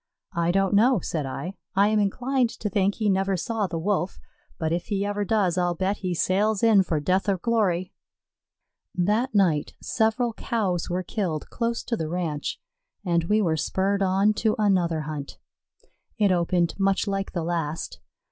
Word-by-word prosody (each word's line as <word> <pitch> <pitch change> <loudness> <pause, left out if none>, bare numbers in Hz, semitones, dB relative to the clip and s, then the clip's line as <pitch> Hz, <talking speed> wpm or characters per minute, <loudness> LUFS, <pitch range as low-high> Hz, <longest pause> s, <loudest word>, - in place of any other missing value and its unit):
"I 170 0 0
don't 195 +1 +1
know," 230 +3 +5
said 155 -4 -3
I. 140 +8 -5 0.2
"I 200 +2 +4
am 215 0 +2
inclined 245 +5 +1
to 210 - -3
think 195 +1 +1
he 215 - -1
never 195 -1 +1
saw 215 +3 -1
the 170 -2 -4
Wolf; 190 +1 -1 0.4
but 160 0 -1
if 175 - -2
he 200 -1 -1
ever 205 0 -1
does, 195 -4 +1
I'll 175 -1 +1
bet 190 +4 -1
he 180 -2 -3
sails 200 +5 +1
in 220 -4 +6
for 165 -4 -1
death 185 +7 +1
or 195 - +2
glory." 185 -4 0 1.0
That 215 +7 +1
night 170 -7 +2
several 225 +1 0
Cows 195 -7 -1
were 180 +1 -1
killed 175 -7 -3
close 235 -1 -2
to 235 - -1
the 160 -6 -3
ranch, 165 -4 -3 0.5
and 170 -2 +1
we 210 +4 +2
were 165 -4 +1
spurred 195 +5 0
on 195 +2 +3
to 220 -1 +2
another 180 -6 +2
hunt. 150 -2 -6 0.8
It 205 -3 +3
opened 175 -1 +1
much 195 0 +2
like 195 -1 -2
the 170 -4 -2
last. 165 -2 -3
190 Hz, 175 wpm, -25 LUFS, 170-210 Hz, 1.0 s, in